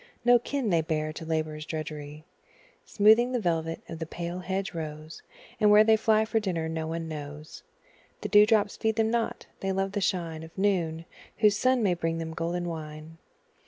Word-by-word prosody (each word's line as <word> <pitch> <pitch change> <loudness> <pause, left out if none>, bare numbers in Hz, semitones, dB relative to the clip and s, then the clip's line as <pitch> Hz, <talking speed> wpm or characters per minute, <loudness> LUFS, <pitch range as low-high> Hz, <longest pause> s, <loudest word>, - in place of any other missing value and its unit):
No 245 0 +6
kin 245 -2 -2
they 165 -1 +3
bear 155 -1 -2
to 160 - -8
labour's 155 -1 -2
drudgery, 155 -1 -6 0.6
Smoothing 220 +4 +4
the 250 - +1
velvet 165 -4 -1
of 165 - -7
the 160 - -4
pale 175 +2 -5
hedge 190 +2 -3
rose; 155 -1 -7 0.4
And 210 - +5
where 210 +1 +8
they 220 0 +5
fly 220 0 +3
for 225 0 +1
dinner 175 -6 -2
no 160 0 -3
one 165 0 -4
knows 150 0 -8 0.6
The - - -3
dew 210 +1 +7
drops 210 -2 +2
feed 220 -1 0
them 220 0 +1
not 235 -1 -1
they 195 - -2
love 195 0 -1
the 205 0 -2
shine 170 -4 -1
Of 160 +2 -12
noon, 170 -5 0 0.3
whose 210 -2 +4
sun 255 +2 +2
may 190 -3 +3
bring 165 -1 -2
them 160 0 -5
golden 170 +2 -2
wine. 155 0 -7
170 Hz, 190 wpm, -28 LUFS, 160-210 Hz, 0.6 s, where